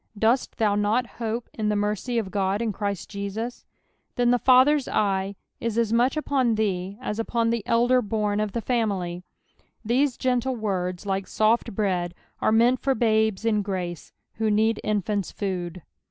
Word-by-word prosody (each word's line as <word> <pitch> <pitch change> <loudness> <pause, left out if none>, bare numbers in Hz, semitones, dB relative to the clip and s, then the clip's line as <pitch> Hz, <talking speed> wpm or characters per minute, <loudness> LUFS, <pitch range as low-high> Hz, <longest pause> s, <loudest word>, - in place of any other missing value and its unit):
Dost 230 +5 +1
thou 215 -2 +2
not 210 +4 +1 0.2
hope 230 +1 -2
in 215 -1 -1
the 210 - +1
mercy 210 +4 -1
of 205 -5 -2
God 195 0 0
in 230 -1 -1
Christ 200 -2 -3
Jesus 210 +4 -5
t - - -42 0.5
Then 245 0 +3
thg^ather's 260 +3 +5
eye 195 -1 0 0.2
is 230 -1 -2
as 230 -1 +1
much 245 +5 +3
upon 265 -6 +1
thee 195 -2 -1
as 225 -4 -4
upon 230 0 0
the 235 -1 0
elder 245 +2 +3
born 210 -1 -1
of 215 -1 -1
the 235 - -2
family, 200 -7 -1 0.7
^hese 260 +2 +2
gentle 255 0 0
words, 185 -4 -2
like 195 -1 -2
soft 220 +1 +1
bread, 180 -4 -1 0.3
ore - - +3
meant 235 +3 +4
for 270 -1 +1
babca 220 -2 +1
in 215 -2 +2
grace, 185 -4 -4 0.3
who 220 -1 +2
need 220 +1 +2
infants' 205 -1 -1
food.') 180 -4 -4
215 Hz, 170 wpm, -25 LUFS, 200-235 Hz, 0.7 s, thg^ather's